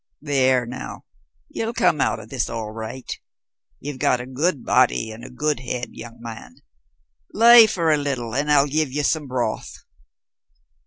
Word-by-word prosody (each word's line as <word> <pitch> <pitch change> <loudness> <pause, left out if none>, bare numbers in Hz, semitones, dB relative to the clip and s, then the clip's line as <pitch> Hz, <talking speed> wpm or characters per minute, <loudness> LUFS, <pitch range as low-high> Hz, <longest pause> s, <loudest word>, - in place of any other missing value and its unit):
"There 130 -4 +2
now, 130 +2 -8 0.4
you'll 225 +1 -4
come 150 - +2
out - - +1
of 110 0 -12
this 125 -1 -2
all 115 -2 -5
right. 115 +3 -7 0.7
You've 140 -2 -7
got 125 - +2
a 125 - -6
good 140 +3 -1
body 120 -2 +2
and 110 +2 -10
a - - -9
good 150 +2 -1
head, 125 -1 -4
young 115 0 -11
man, 115 -1 -9 0.8
lie 235 0 +8
by 165 -6 +1
a - - +2
little 130 -6 -3
and 145 +3 0
I'll 140 -1 +5
give 150 -1 -1
ye 145 +2 -2
some 150 0 0
broth." 125 -4 -3
130 Hz, 165 wpm, -22 LUFS, 120-150 Hz, 0.8 s, lie